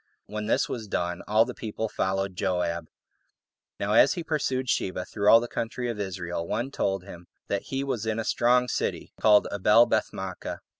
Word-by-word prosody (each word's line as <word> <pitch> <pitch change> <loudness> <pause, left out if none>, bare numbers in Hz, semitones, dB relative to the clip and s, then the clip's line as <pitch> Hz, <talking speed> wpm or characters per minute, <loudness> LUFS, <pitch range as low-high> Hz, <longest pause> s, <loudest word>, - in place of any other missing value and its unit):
When 105 0 -5
this - - +2
was 110 -4 -5
done, 90 -2 -2
all 110 +2 +4
the 125 - -6
people 110 0 -4
followed 95 -2 -1
Joab. 90 -2 -1 0.9
Now 100 +1 0
as 135 +5 +6
he 170 - -4
pursued 135 -5 -1
Sheba 95 -5 -1
through 105 -1 +1
all 115 - +9
the 120 - -4
country 120 +1 -3
of 110 - -7
Israel, 90 -3 -4
one 120 +8 -2
told 95 -7 -1
him 85 -3 -11 0.2
that 100 -1 -1
he 135 0 -1
was 120 -6 -3
in 110 0 0
a 115 - -1
strong 125 +2 +3
city, - - -3
called 105 -1 +5
Abelbeth 105 +4 +4
maachah. 95 -1 -6
105 Hz, 185 wpm, -27 LUFS, 95-120 Hz, 0.9 s, all